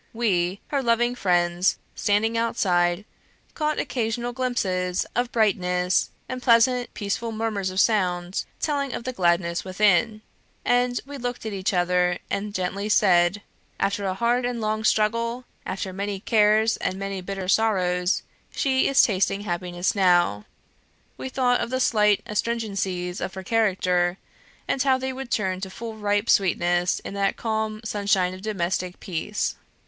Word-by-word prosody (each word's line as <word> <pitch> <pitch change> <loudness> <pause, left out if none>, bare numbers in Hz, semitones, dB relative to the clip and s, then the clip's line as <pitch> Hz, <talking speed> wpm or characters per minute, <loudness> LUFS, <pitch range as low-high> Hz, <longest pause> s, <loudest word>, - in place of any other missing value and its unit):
We, 195 -5 0
her 280 -2 0
loving 240 0 +2
friends, 175 -4 +1 0.2
standing 215 +3 +1
outside, 185 -5 +1 0.5
caught 305 -1 -1
occasional 240 -1 -2
glimpses 190 -8 -1
of 245 0 0
brightness, 180 -5 +1 0.2
and 255 0 -5
pleasant 245 +1 +3
peaceful 220 +3 -2
murmurs 215 -3 -2
of 185 +1 -2
sound, 180 -4 +1 0.2
telling 285 -4 -1
of - - -4
the 255 +1 -4
gladness 170 -3 +1
within; 210 +3 +2 0.4
and 245 0 +2
we 285 0 -8
looked 245 -1 -4
at 220 - -3
each 190 -1 -1
other, 180 -1 +2
and 205 +1 -3
gently 195 +3 -2
said, 190 -1 +3 0.4
"After 200 0 0
a 185 - -1
hard 240 +4 +1
and 245 -1 -2
long 215 0 -1
struggle 230 +3 +1 0.2
after 190 0 -4
many 200 +1 -3
cares 215 +1 +3
and 185 - -2
many 195 -1 -4
bitter 195 0 -5
sorrows 185 -3 +1 0.3
she 265 -2 +1
is 275 - +5
tasting 195 -1 +1
happiness 175 -2 -2
now!" 175 - +3 0.7
We 265 - -6
thought 250 -1 +1
of - - -2
the 255 +1 -1
slight 210 -4 +3
astringencies 200 -5 -2
of 190 - -4
her 190 - -6
character, 185 -4 +1 0.5
and 270 - 0
how 265 -1 +3
they 260 0 -3
would 265 -1 -7
turn 190 -5 -1
to 190 - -4
full 225 +4 -7
ripe 205 0 0
sweetness 175 -1 +2
in - - -7
that 200 0 0
calm 220 -1 -2
sunshine 200 -4 +1
of 185 - -9
domestic 185 -3 -2
peace. 190 +4 -3
205 Hz, 150 wpm, -24 LUFS, 185-230 Hz, 0.7 s, is